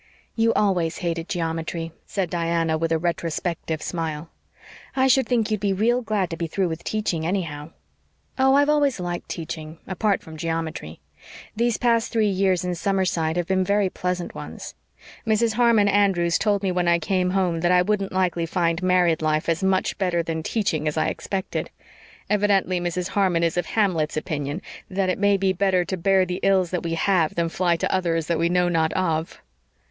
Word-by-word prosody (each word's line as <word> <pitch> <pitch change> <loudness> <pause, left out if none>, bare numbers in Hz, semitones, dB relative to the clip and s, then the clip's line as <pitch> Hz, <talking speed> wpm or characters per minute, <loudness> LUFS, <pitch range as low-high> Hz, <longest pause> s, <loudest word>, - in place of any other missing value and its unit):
"You 225 0 +3
always 180 -5 +1
hated 165 0 -2
geometry," 165 -1 -3 0.2
said 190 -4 -2
Diana 165 -1 0
with 165 +1 -1
a 165 - +3
retrospective 165 -1 -2
smile. 165 -2 -4 0.6
"I 260 0 +3
should 265 0 +4
think 230 -3 +1
you'd 215 - 0
be 200 -1 0
real 235 +6 +2
glad 210 -6 -1
to 165 - -4
be 170 - -2
through 185 +2 -1
with 160 0 -5
teaching, 205 -7 -2
anyhow." 160 -4 -3 0.7
"Oh, 265 +1 +5
I've 285 +1 +4
always 290 -6 +2
liked 175 -1 -4
teaching, 160 -1 -6
apart 195 +2 0
from 160 -1 -10
geometry. 165 - -4 0.5
These 235 0 +1
past 230 -1 +1
three 220 -3 +2
years 185 -2 +1
in 180 - -1
Summerside 175 -3 0
have 175 - 0
been 190 +1 +1
very 200 0 +1
pleasant 180 -1 -3
ones. - - -8 0.5
Mrs. 220 +1 +2
Harmon 230 -3 +4
Andrews 195 -4 +2
told 205 -2 +1
me 190 - +1
when 180 -1 0
I 170 0 +4
came 180 +2 0
home 180 -3 0
that 175 +1 +2
I 180 0 +5
wouldn't 200 0 -1
likely 180 -3 0
find 170 -1 0
married 180 -3 +2
life 155 0 0
as 165 +2 0
much 190 0 +1
better 175 -3 +1
than 160 -1 -3
teaching 160 -5 -1
as 150 - -2
I 155 - +2
expected. 190 -1 -4 0.6
Evidently 200 -3 +2
Mrs. 175 +1 -2
Harmon 185 -4 +1
is 165 -1 +1
of 175 - -1
Hamlet's 175 -9 0
opinion 150 +2 -3 0.3
that 190 0 0
it 185 - -1
may 205 0 +3
be 190 -1 +1
better 185 -1 +1
to 190 - -2
bear 190 +1 +3
the 180 0 -4
ills 190 -3 +2
that 180 - -1
we 165 0 -2
have 165 -2 +1
than 170 -1 0
fly 175 0 +1
to 165 - -1
others 165 -3 0
that 165 0 -1
we 170 +1 +2
know 180 0 +2
not 160 -2 +1
of." 165 -3 -1
180 Hz, 190 wpm, -23 LUFS, 165-195 Hz, 0.7 s, Oh